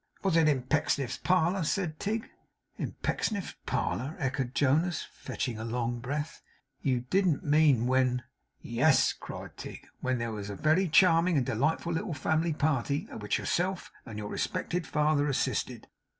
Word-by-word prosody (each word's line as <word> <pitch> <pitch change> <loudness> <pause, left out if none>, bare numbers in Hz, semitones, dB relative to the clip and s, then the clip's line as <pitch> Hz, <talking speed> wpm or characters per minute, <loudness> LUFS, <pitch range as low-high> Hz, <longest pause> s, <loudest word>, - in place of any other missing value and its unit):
'Was 190 -4 +2
it 165 -2 +5
in 135 -4 +1
Pecksniff's 140 -2 0
parlour?' 180 0 +2
said 160 -1 -1
Tigg 220 +2 -2 0.5
'In - - -4
Pecksniff's 205 -4 -1
parlour!' 140 +7 -1
echoed 130 -4 -2
Jonas, 155 +5 +2
fetching 120 -5 -4
a - - -4
long 120 +1 -2
breath. 145 +6 -4 0.4
'You 130 -3 +1
don't 185 -6 +2
mean 145 -5 +4
when 125 -1 +2 0.2
' - - -46
'Yes,' 135 +5 +3
cried - - -9
Tigg, - - -8
'when 130 0 0
there 115 -1 -2
was 105 -2 -5
a 100 - -4
very 160 - +3
charming 165 0 +5
and 130 - +2
delightful 155 +9 0
little 160 -1 -2
family 160 +3 +1
party, 145 -2 0
at - - -7
which 105 -1 0
yourself 185 +1 -1
and 110 -4 -8
your 105 -1 -5
respected 180 -2 -2
father 150 -1 +2
assisted. 135 - -1
150 Hz, 160 wpm, -30 LUFS, 125-165 Hz, 0.5 s, it